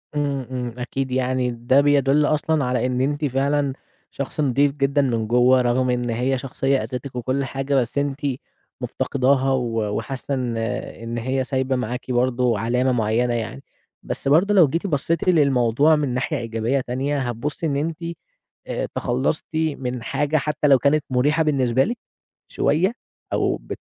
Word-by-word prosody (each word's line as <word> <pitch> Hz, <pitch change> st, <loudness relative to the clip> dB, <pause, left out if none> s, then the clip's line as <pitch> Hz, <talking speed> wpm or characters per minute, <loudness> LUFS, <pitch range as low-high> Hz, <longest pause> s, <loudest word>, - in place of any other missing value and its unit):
إمم، 140 Hz, -3 st, -1 dB
إمم، 125 Hz, -2 st, -3 dB
أكيد 130 Hz, +1 st, -3 dB
يعني 130 Hz, -1 st, 0 dB
ده 120 Hz, +4 st, +3 dB
بيدُل 145 Hz, 0 st, +3 dB
أصلًا 155 Hz, -1 st, +1 dB
على 125 Hz, 0 st, 0 dB
إن 125 Hz, 0 st, 0 dB
أنتِ 145 Hz, +3 st, 0 dB
فعلًا 140 Hz, +1 st, +1 dB, 0.4 s
شخص 140 Hz, +2 st, -6 dB
نضيف 140 Hz, +1 st, +3 dB
جدًا 140 Hz, 0 st, +1 dB
من 115 Hz, -5 st, 0 dB
جوا. 125 Hz, +2 st, +4 dB
رغم 125 Hz, +1 st, +1 dB
إن 125 Hz, -1 st, 0 dB
هي 125 Hz, +3 st, 0 dB
شخصية 135 Hz, +1 st, -1 dB
أذِتِك 125 Hz, +1 st, -6 dB
وكل 130 Hz, +3 st, -1 dB
حاجة 135 Hz, +1 st, -2 dB
بس 125 Hz, -1 st, 0 dB
أنتِ 140 Hz, 0 st, -1 dB, 0.6 s
مفتقداها 135 Hz, 0 st, +1 dB
و 115 Hz, -5 st, -1 dB
وحاسة 135 Hz, +1 st, -4 dB
إن 125 Hz, -3 st, -2 dB
إن 115 Hz, +1 st, -4 dB
هي 130 Hz, +3 st, -1 dB
سايبة 130 Hz, 0 st, -1 dB
معاكِ 125 Hz, +1 st, -3 dB
برضه 125 Hz, -2 st, +1 dB
علامة 125 Hz, +4 st, +1 dB
مُعينة 120 Hz, +1 st, +1 dB
يعني. 120 Hz, +4 st, -4 dB, 0.4 s
بس -, -, -5 dB
برضه 170 Hz, +9 st, +4 dB
لو 180 Hz, -6 st, +7 dB
جيتِ 165 Hz, +8 st, -2 dB
بصيتِ 165 Hz, +3 st, 0 dB
للموضوع 140 Hz, -2 st, +4 dB
من 145 Hz, -4 st, -1 dB
ناحية 135 Hz, +4 st, -1 dB
إيجابية 115 Hz, +3 st, -1 dB
تانية، 135 Hz, +4 st, -2 dB
هتبصي 130 Hz, +5 st, -3 dB
إن 145 Hz, -3 st, 0 dB
أنتِ 160 Hz, +3 st, -3 dB, 0.6 s
آآ، -, -, -2 dB
تخلصتِ 130 Hz, +5 st, -1 dB
من 135 Hz, -6 st, -2 dB
حاجة 150 Hz, +6 st, 0 dB
حتى 150 Hz, 0 st, 0 dB
لو 135 Hz, -2 st, +7 dB
كانت 145 Hz, +2 st, +2 dB
مُريحة 145 Hz, +5 st, +2 dB
بالنسبة 130 Hz, -4 st, +2 dB
لِك 235 Hz, -, -3 dB, 0.5 s
شوية 185 Hz, +8 st, +1 dB, 0.4 s
أو -, -, +1 dB
بت -, -, -8 dB
130 Hz, 160 wpm, -22 LUFS, 125-145 Hz, 0.6 s, لو